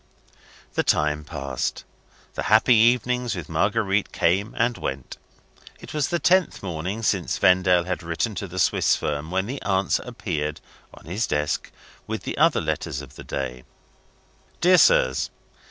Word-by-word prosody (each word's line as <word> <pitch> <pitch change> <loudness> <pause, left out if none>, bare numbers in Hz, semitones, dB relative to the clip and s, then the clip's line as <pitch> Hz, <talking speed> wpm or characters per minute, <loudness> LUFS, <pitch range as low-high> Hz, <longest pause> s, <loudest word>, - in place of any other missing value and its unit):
The - - +1
time 75 0 +1
passed 70 -4 -4 0.5
the - - -4
happy 110 +4 +6
evenings 120 0 +3
with 85 -5 -6
Marguerite 100 +4 0
came 100 +6 +1
and 120 +1 +1
went. 65 - -5 0.6
It - - -10
was 150 -3 0
the 175 - 0
tenth 180 - +2
morning 90 +5 -4
since 95 -5 0
Vendale 90 -2 +4
had 90 +1 -3
written 85 +7 -2
to 100 - -5
the 90 +1 -9
Swiss 90 - +3
firm, 75 +1 -3
when 95 +2 0
the 135 +5 -5
answer 95 0 +1
appeared, 80 - -4 0.3
on - - -16
his 95 +8 -2
desk, 75 0 -1 0.4
with - - -4
the - - -4
other - - +4
letters 70 +1 -3
of 70 - -13
the - - -10
day: 65 -2 -5 1.0
"Dear 180 +1 +5
Sirs. 65 - +4
95 Hz, 155 wpm, -24 LUFS, 75-115 Hz, 1.0 s, happy